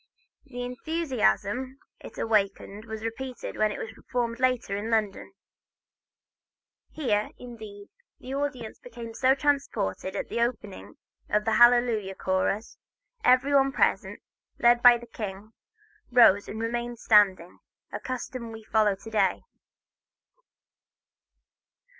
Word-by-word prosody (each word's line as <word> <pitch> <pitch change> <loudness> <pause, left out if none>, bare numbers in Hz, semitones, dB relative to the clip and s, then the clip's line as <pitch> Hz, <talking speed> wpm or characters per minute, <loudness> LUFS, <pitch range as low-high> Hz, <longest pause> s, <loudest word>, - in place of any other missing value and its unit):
The 245 -3 -7
enthusiasm 255 - -1 0.2
it - - -12
awakened 205 -1 -1
was 220 -1 -7
repeated 250 +3 -6
when 215 0 +1
it - - -5
was 220 - -6
performed 235 -2 -3
later 255 -5 0
in 210 +3 -4
London. 215 -4 -1 1.6
Here, 215 -9 -1
indeed, 215 -4 -11 0.3
the 260 - -8
audience 275 -5 -4
became 235 -1 -9
so 260 +3 +3
transported 275 - -1
that - - 0
at - - -14
the 235 - -2
opening 225 -5 -4 0.3
of 210 0 +1
the 225 - +1
Hallelujah 240 -4 +4
chorus 190 +4 -2 0.4
every 255 +3 +4
one 275 -1 +4
present, - - 0 0.3
led 240 0 +4
by 245 -1 +8
the 240 - -12
king, 210 -1 -8 0.6
rose 225 -5 +6
and 220 - -6
remained 240 +1 -3
standing, 195 -6 +3 0.3
a - - -5
custom 255 -2 -6
we 220 0 -10
follow 215 -2 +2
to 210 +3 -12
day. 200 -4 +1
230 Hz, 125 wpm, -27 LUFS, 210-250 Hz, 1.6 s, by